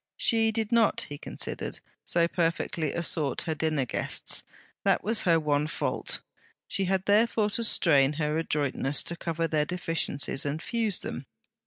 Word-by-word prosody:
She 225 Hz, -2 st, +4 dB
did 220 Hz, 0 st, -2 dB
not, 230 Hz, -2 st, +3 dB
he 145 Hz, 0 st, -7 dB
considered, -, -, -4 dB, 0.2 s
so 170 Hz, -1 st, +2 dB
perfectly 165 Hz, -3 st, -1 dB
assort 155 Hz, -4 st, 0 dB
her 160 Hz, -, -1 dB
dinner 155 Hz, -3 st, 0 dB
guests; -, -, -1 dB, 0.4 s
that -, -, +2 dB
was 220 Hz, +1 st, +2 dB
her 165 Hz, -1 st, +5 dB
one 150 Hz, -1 st, +1 dB
fault. -, -, -2 dB, 0.5 s
She 195 Hz, -, +2 dB
had 190 Hz, 0 st, 0 dB
therefore 210 Hz, 0 st, +3 dB
to 230 Hz, -, -1 dB
strain 145 Hz, -9 st, +4 dB
her 150 Hz, 0 st, -1 dB
adroitness 145 Hz, -3 st, -1 dB
to 170 Hz, -, 0 dB
cover 165 Hz, -1 st, -2 dB
their 155 Hz, -2 st, +1 dB
deficiencies 165 Hz, -5 st, -1 dB
and 145 Hz, +2 st, -2 dB
fuse 220 Hz, 0 st, 0 dB
them. -, -, -5 dB
165 Hz, 155 wpm, -28 LUFS, 150-205 Hz, 0.5 s, her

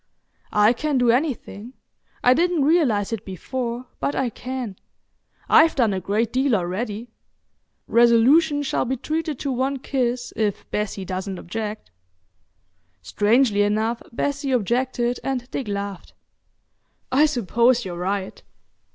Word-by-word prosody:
"I 210 Hz, +2 st, +5 dB
can 295 Hz, +3 st, -1 dB
do 245 Hz, -2 st, +4 dB
anything. 245 Hz, -4 st, -2 dB, 0.5 s
I 250 Hz, -, +6 dB
didn't 335 Hz, 0 st, +2 dB
realise 250 Hz, -, +2 dB
it 220 Hz, -2 st, -4 dB
before, 235 Hz, +6 st, -4 dB
but 285 Hz, -, -1 dB
I 255 Hz, -3 st, 0 dB
can. 250 Hz, -5 st, -6 dB, 0.7 s
I've 320 Hz, 0 st, +5 dB
done 230 Hz, -6 st, +2 dB
a 190 Hz, -, -1 dB
great 210 Hz, +5 st, -1 dB
deal 260 Hz, -1 st, +2 dB
already. 210 Hz, +5 st, -3 dB, 0.7 s
Resolution 265 Hz, +6 st, +4 dB
shall 275 Hz, -, 0 dB
be 260 Hz, +1 st, -2 dB
treated 310 Hz, +2 st, -3 dB
to 280 Hz, -, -3 dB
one 265 Hz, +2 st, -1 dB
kiss 250 Hz, -2 st, -2 dB
if 210 Hz, -3 st, -2 dB
Bessie 210 Hz, -2 st, -3 dB
doesn't 185 Hz, +1 st, -4 dB
object." 210 Hz, -, -6 dB, 1.1 s
Strangely 210 Hz, -, +2 dB
enough, 220 Hz, +3 st, 0 dB
Bessie 280 Hz, +3 st, -2 dB
objected 245 Hz, +1 st, 0 dB
and 255 Hz, -2 st, -2 dB
Dick 260 Hz, -, -4 dB
laughed. 200 Hz, -2 st, -5 dB, 1.0 s
"I 290 Hz, +4 st, +5 dB
suppose 240 Hz, -1 st, +2 dB
you're 180 Hz, -2 st, -5 dB
right. 190 Hz, +2 st, -3 dB
240 Hz, 125 wpm, -23 LUFS, 210-265 Hz, 1.1 s, I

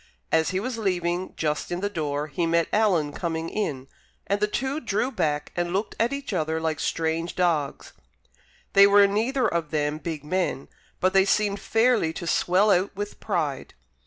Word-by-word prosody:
As 160 Hz, 0 st, +3 dB
he 185 Hz, -, -1 dB
was 235 Hz, +2 st, -4 dB
leaving, 180 Hz, -2 st, -1 dB
just 150 Hz, +2 st, -2 dB
in 175 Hz, -, -2 dB
the 200 Hz, -, -1 dB
door, 150 Hz, -6 st, -2 dB
he 165 Hz, +3 st, -2 dB
met 165 Hz, 0 st, +2 dB
Alan 180 Hz, -9 st, +2 dB
coming 165 Hz, -1 st, -3 dB
in; 140 Hz, -11 st, -3 dB, 0.4 s
and 200 Hz, +1 st, 0 dB
the 210 Hz, -, +2 dB
two 265 Hz, +7 st, -2 dB
drew 235 Hz, 0 st, -1 dB
back 150 Hz, -, -1 dB
and 175 Hz, 0 st, -1 dB
looked 200 Hz, +3 st, -1 dB
at 230 Hz, +3 st, +2 dB
each 280 Hz, -5 st, -4 dB
other 160 Hz, -2 st, 0 dB
like 160 Hz, -1 st, -2 dB
strange 165 Hz, +1 st, -1 dB
dogs. 165 Hz, -6 st, -1 dB, 0.8 s
They 200 Hz, 0 st, +8 dB
were 200 Hz, 0 st, +6 dB
neither 230 Hz, +6 st, +1 dB
of 170 Hz, -5 st, -2 dB
them 150 Hz, 0 st, -1 dB
big 160 Hz, -3 st, -5 dB
men, 165 Hz, -3 st, -2 dB, 0.3 s
but 185 Hz, +1 st, +2 dB
they 195 Hz, 0 st, +5 dB
seemed 205 Hz, 0 st, +1 dB
fairly 225 Hz, -7 st, +2 dB
to 170 Hz, -, -6 dB
swell 185 Hz, +5 st, +3 dB
out 190 Hz, +2 st, +1 dB
with 205 Hz, +1 st, -5 dB
pride. 160 Hz, -9 st, -2 dB
180 Hz, 180 wpm, -25 LUFS, 160-205 Hz, 0.8 s, They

